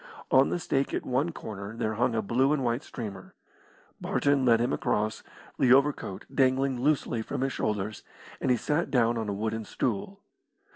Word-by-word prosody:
On 130 +1 +5
the - - 0
stake 140 -5 -1
at - - -3
one 135 +7 0
corner 105 -6 -7
there 110 -2 -1
hung 120 +2 +1
a 110 - 0
blue 130 +7 +2
and 145 -3 0
white 120 +1 0
streamer. 100 -6 -8 0.7
Barton 140 -2 +1
led 115 -2 +5
him 120 +2 0
across, 110 +1 -1 0.4
the 125 - +4
overcoat 135 -8 +1
dangling 130 -1 +2
loosely 135 -5 +1
from 110 - -4
his 135 0 0
shoulders, 105 0 -2 0.4
and - - 0
he 125 - +4
sat 150 +8 -1
down 120 -2 +3
on 110 -2 -2
a - - -1
wooden 110 +2 -2
stool. 120 - -3
120 Hz, 180 wpm, -28 LUFS, 110-135 Hz, 0.7 s, On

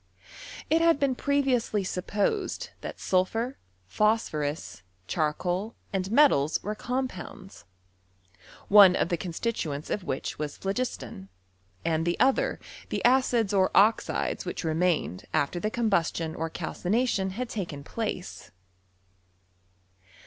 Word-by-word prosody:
It 320 +1 +3
had 330 -3 +4
been 275 -2 +2
previously 255 -6 +1
supposed 205 - -2
that - - -6
t&lphur, 225 +8 0 0.3
phosphorus, 155 - -1 0.2
charcoal, 175 - -1 0.2
and 190 -1 -1
metals, 225 - +4
were 210 - -2
compounds; 215 -5 -5 1.0
one 195 -3 +8
of - - +1
the 175 - 0
constituents 165 -4 -3
of 205 - -1
which 135 -3 -4
was 150 -1 -4
plilogistDn, 195 - -4 0.6
and 165 -1 +1
the 170 +1 -1
other 265 +1 +2 0.3
the - - -2
acids 240 -4 +3
or 190 -1 +4
oxides 215 +3 +2
which - - -4
vemamed 160 - 0
aiter 145 +5 +1
the 215 - 0
combustion 170 -8 0
or 165 +1 -3
calcination 190 +5 -1
had 250 -1 -3
tdoen 170 -11 -5
place. 215 -4 -5
195 Hz, 115 wpm, -27 LUFS, 165-235 Hz, 1.0 s, one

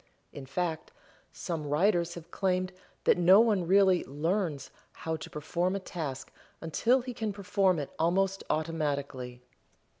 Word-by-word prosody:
In 135 -2 -8
fact, 160 +2 -3 0.4
some 165 -4 -4
writers 170 +2 +2
have 170 -2 -10
claimed 185 -1 0 0.3
that - - +4
no 185 +3 +7
one 210 -7 +3
really 190 -1 +5
"learns" 155 0 -2 0.2
how 160 0 -3
to - - -9
perform 170 +5 -1
a - - -1
task 150 -8 -6 0.3
until 230 - +2
he 250 0 -6
can 220 -2 -2
perform 195 -2 +1
it 145 -2 -4
almost 195 +3 +1
automatically. 140 -6 -2
175 Hz, 140 wpm, -30 LUFS, 150-195 Hz, 0.4 s, no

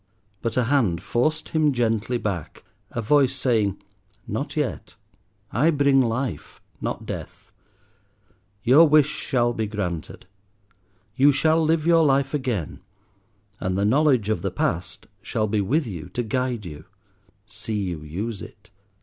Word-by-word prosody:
But 115 - -2
a 125 - +4
hand 115 - +1
forced 125 +10 0
him 155 -2 +2
gently 115 0 0
back, 95 -9 -5 0.3
a 115 - -4
voice 135 +2 +3
saying, 110 -7 +1 0.5
"Not - - -4
yet; - - -3 0.6
I 145 +10 +3
bring 140 -3 +4
life, 120 0 -3 0.2
not - - -4
death. - - -8 1.1
Your 150 +7 +7
wish 150 -1 +6
shall 120 -5 0
be 110 -2 -2
granted. 95 -6 -5 0.9
You 140 +2 +6
shall 160 +3 +2
live 160 0 +1
your 165 -1 +5
life 140 -1 +2
again, 125 - -2 0.8
and 90 0 -1
the 100 - +1
knowledge 130 -2 +3
of 110 - 0
the 100 - -1
past 90 -1 -3 0.2
shall 110 - -1
be 105 0 0
with 145 - +1
you 90 -9 -7
to 120 - 0
guide 125 -1 -2
you. 75 -2 -9 0.6
See 110 0 -5
you 90 -6 -2
use 95 +8 -5
it. - - -13
120 Hz, 140 wpm, -24 LUFS, 100-140 Hz, 1.1 s, Your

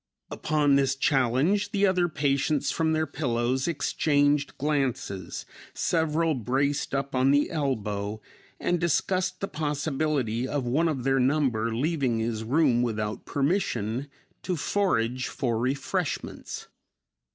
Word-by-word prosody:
Upon 150 -2 +2
this 135 -1 +2
challenge, 135 - +2
the 200 -1 +2
other 180 -2 +2
patients 145 0 +1
from 160 -1 +1
their 160 0 +1
pillows 130 -2 -1
exchanged 145 -2 +1
glances, 135 - -2 0.3
several 160 -1 +1
braced 140 +4 0
up 140 0 -2
on 130 +1 +3
the 145 +1 +3
elbow 105 -8 -2 0.4
and 175 0 0
discussed 185 +2 0
the 195 - -1
possibility 145 - -1
of 140 -2 -2
one 145 +8 +2
of 140 -6 -2
their 135 0 +2
number 125 -4 +1
leaving 135 -3 0
his 110 -1 -2
room 130 0 +3
without 110 -3 -2
permission 135 - -1 0.3
to 180 - -2
forage 130 - 0
for 115 -4 -1
refreshments. 130 +3 -3
140 Hz, 120 wpm, -27 LUFS, 125-155 Hz, 0.4 s, on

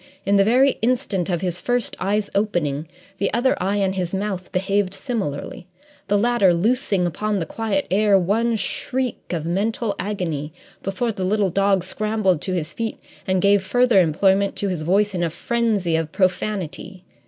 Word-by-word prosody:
In 200 +1 +3
the 200 - +5
very 255 +6 +3
instant 225 -7 0
of 175 -2 -1
his 180 -2 -2
first 245 -2 -1
eye's 205 +2 -1
opening, 165 -8 -1 0.3
the 200 - +1
other 255 +3 +2
eye 195 +2 0
and 195 -2 +1
his 185 -1 -2
mouth 190 -2 -3
behaved 195 +1 0
similarly, 190 - -4 0.4
the 205 - +2
latter 205 -5 +3
loosing 205 -1 +1
upon 210 +5 -1
the 170 - -2
quiet 200 +1 -2
air 205 0 +4
one 225 +6 +1
shriek 255 +3 -3
of 165 -3 -2
mental 205 +4 -1
agony 165 -7 -3 0.3
before 195 +5 -1
the 195 -3 -5
little 200 0 +1
dog 195 0 +2
scrambled 205 -3 0
to 185 - -3
his 170 -2 -3
feet 225 -1 -3 0.3
and 185 -1 +1
gave 200 0 +5
further 245 0 +4
employment 190 +4 +2
to 200 - -2
his 180 -4 -3
voice 195 +5 +2
in 180 - -2
a 170 - +1
frenzy 210 -3 0
of 160 -1 -1
profanity. 185 -1 -2
195 Hz, 170 wpm, -22 LUFS, 180-215 Hz, 0.4 s, the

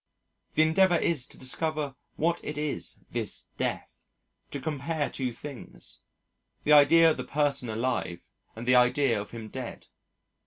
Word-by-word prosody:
The 155 - +6
endeavour 175 +3 +4
is 150 -6 +1
to - - -11
discover 150 +2 -2 0.2
what 170 +2 +1
it 150 - -5
is, 150 -1 -2
this - - -2
Death, - - -4 0.4
to 140 - -5
compare 150 +2 -2
two 130 -2 -2
things, 135 +2 -8 0.6
the 150 - +4
idea 160 +3 +7
of - - -2
the - - -3
person 140 -4 0
alive 110 -6 -2 0.2
and 115 +2 -7
the 125 - +5
idea 125 -2 +4
of 105 - -9
him 115 -2 -8
dead. 130 -1 -7
145 Hz, 150 wpm, -28 LUFS, 125-155 Hz, 0.6 s, idea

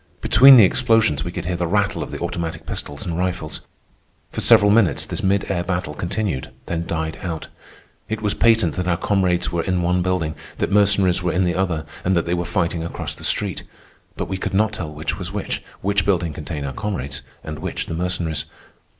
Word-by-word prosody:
Between 135 +4 +8
the 115 - +9
explosions 115 - +3
we 85 - -4
could 85 -1 -5
hear 90 0 -1
the 85 0 -1
rattle 100 +2 +1
of - - -4
the - - -5
automatic 85 -2 -4
pistols 70 0 -5
and 85 -1 -3
rifles. 90 -4 -2 0.7
For - - -3
several 100 +1 +6
minutes 100 -9 +3
this - - -4
mid 100 +1 +1
air 85 -2 0
battle 90 0 -2
continued, 85 -7 -2 0.2
then 85 0 -3
died 80 -1 -3
out. 80 -3 -5 0.6
It 110 -1 -2
was 105 -2 0
patent 115 -9 +3
that 90 0 -2
our 85 -2 +2
comrades 90 -3 +1
were 85 -1 0
in 90 0 -1
one 90 +1 +2
building, 90 -4 0 0.2
that - - -1
Mercenaries 100 -3 +3
were 90 -1 0
in 90 - +2
the 90 -1 +1
other, 85 -4 -1 0.2
and 95 0 +2
that 85 - +1
they 85 - -1
were 85 0 -1
fighting 85 -3 -1
across 85 - -4
the - - -12
street. - - +1 0.6
But - - -3
we 95 -1 -4
could 95 0 -3
not 110 +1 +2
tell 85 -7 -5
which 75 0 -4
was - - -5
which—which 100 0 -2
building 85 -5 0
contained 75 -1 -5
our 70 - -4
comrades 70 -9 -4 0.2
and 75 -1 -6
which - - -3
the - - -5
Mercenaries. 85 -3 -2
90 Hz, 205 wpm, -21 LUFS, 80-100 Hz, 0.7 s, the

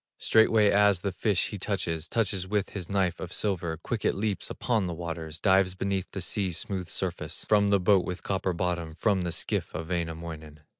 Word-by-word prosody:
Straightway 110 -2 +4
as 100 -3 +4
the 100 - -1
fish 100 +1 +1
he 105 - -6
touches, 85 -5 -2
Touches 100 -5 0
with 100 0 -1
his 95 -4 -5
knife 95 -3 0
of 90 - -6
silver, 85 -6 -1
Quick 105 +7 -4
it - - +2
leaps 100 -3 -2
upon 110 -6 0
the 85 - -4
waters, 80 -2 -5
Dives 95 -2 +3
beneath 95 0 -2
the 95 - -5
sea's 90 -1 0
smooth 95 -1 -4
surface, - - -3
From 105 -1 +4
the 100 0 +4
boat 95 0 +4
with 90 0 -5
copper 95 -1 -1
bottom, 85 -2 -2
From 100 +2 +1
the 85 -1 -2
skiff - - -1
of 80 +2 -5
Wainamoinen. 80 -3 -4
95 Hz, 195 wpm, -28 LUFS, 85-100 Hz, -, Straightway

